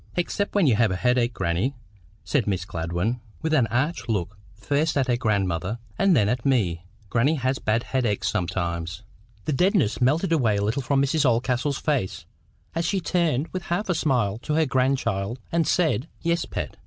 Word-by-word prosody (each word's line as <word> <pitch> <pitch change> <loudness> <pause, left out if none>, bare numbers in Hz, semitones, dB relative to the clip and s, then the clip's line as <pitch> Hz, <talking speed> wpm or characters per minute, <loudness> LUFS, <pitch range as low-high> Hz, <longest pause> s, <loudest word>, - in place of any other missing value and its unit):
"Except 200 +4 -1
when 200 -4 +4
you 125 -6 +4
have 115 -1 +4
a 95 - -1
headache, 125 +3 +2
grannie," 90 +11 0 0.5
said 130 -8 0
Miss 95 -3 -1
Gladwyn, 85 +8 -2 0.2
with 160 0 0
an 130 -7 +4
arch 130 +4 -1
look 105 -2 -1 0.2
first 145 +9 0
at 135 - +3
her 120 - +2
grandmother, 100 -4 0 0.2
and 195 -3 +3
then 105 -4 +3
at 120 +2 -1
me. 90 -11 +1 0.3
"Grannie 135 +7 +3
has 130 -1 -1
bad 110 +2 0
headaches 120 -6 -1
sometimes." 85 0 -2 0.4
The 155 - 0
deadness 180 - +2
melted 155 +8 +2
a 165 - +4
little 110 0 +1
from 135 +2 +2
Mrs 150 +2 +1
Oldcastle's 125 +2 +1
face, 140 - -1 0.5
as 165 - -1
she 190 +3 0
turned 165 -5 0
with 185 -1 -5
half 185 +4 -2
a - - +3
smile 120 - +1
to 150 +5 -2
her 160 0 +3
grandchild, 130 -5 0
and 165 -2 +1
said— 160 -5 +1
"Yes, 170 0 0
Pet. - - -5
125 Hz, 180 wpm, -25 LUFS, 105-155 Hz, 0.5 s, when